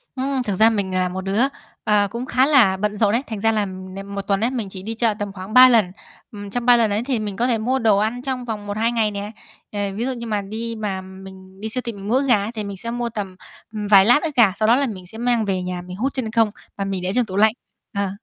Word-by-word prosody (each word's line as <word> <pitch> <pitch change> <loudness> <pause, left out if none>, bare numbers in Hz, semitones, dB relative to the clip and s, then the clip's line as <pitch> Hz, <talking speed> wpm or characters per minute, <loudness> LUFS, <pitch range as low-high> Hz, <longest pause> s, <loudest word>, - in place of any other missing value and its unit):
Ừm, 265 0 -1
thực 205 -5 -2
ra 220 +4 +5
mình 200 -4 -2
là 185 0 +1
một 185 +1 -5
đứa, 195 +4 0 0.4
ờ, 205 -1 +3
cũng 235 +3 -4
khá 260 0 +2
là 245 -10 +5
bận 210 +1 -2
rộn 205 -1 +2
ấy, 245 +4 +1
thành 220 -3 -5
ra 225 +2 +2
là 215 -2 0
n 185 0 -9 0.2
một 200 - -2
tuần 195 0 0
ấy, 235 - +2
mình 230 -7 -3
chỉ 190 -1 -8
đi 220 +3 -4
chợ 225 -1 +2
tầm 205 -1 -3
khoảng 195 +2 -8
3 255 0 +9
lần. 220 -7 +3 0.4
Ừm, 205 -1 -8
trong 240 +3 -3
3 245 -1 +7
lần 225 -3 +2
ấy, 210 +3 0
thì 250 -4 -1
mình 205 -2 -4
có 240 +3 +1
thể 240 -3 +2
mua 250 +5 0
đồ 220 -4 +3
ăn 220 +4 -1
trong 255 -2 -3
vòng 215 -3 -5
1,2 220 +3 0
ngày 225 -3 +1
nè. 205 +1 -5 0.4
Ờ, 205 - -4 0.2
ví 230 +4 -2
dụ 265 - -1
như 235 -1 -7
mà 210 -2 -1
đi 225 +3 -5
mà 195 -3 -3
mình 190 0 -13
đi 220 - -3
siêu 255 +3 -1
thị 235 - -2
mình 200 -1 -9
mua 230 - +1
ức 275 +2 +2
gà 215 -6 +4
ấy 215 - -4
thì 220 -3 -5
mình 200 -1 -6
sẽ 230 +5 -5
mua 240 0 -2
tầm, 200 -4 -5 0.4
ừm, 210 -1 -4
vài 195 -2 +7
lát 245 +7 +5
ức 310 -3 -3
gà, 220 -6 +5
sau 215 +1 0
đó 230 - +6
là 275 +1 +1
mình 190 -6 -7
sẽ 205 +5 -11
mang 240 -1 +1
về 190 -2 -1
nhà 180 0 -4
mình 180 +1 -9
hút 265 +6 -1
chân 240 -5 -3
không 225 -2 +2 0.3
và 200 - -2
mình 195 -2 -3
để 180 +1 -1
trong 250 -1 +3
tủ 190 -3 -7
lạnh. 215 +2 +4 0.4
Ờ. 200 -1 0
215 Hz, 300 wpm, -21 LUFS, 195-235 Hz, 0.4 s, 3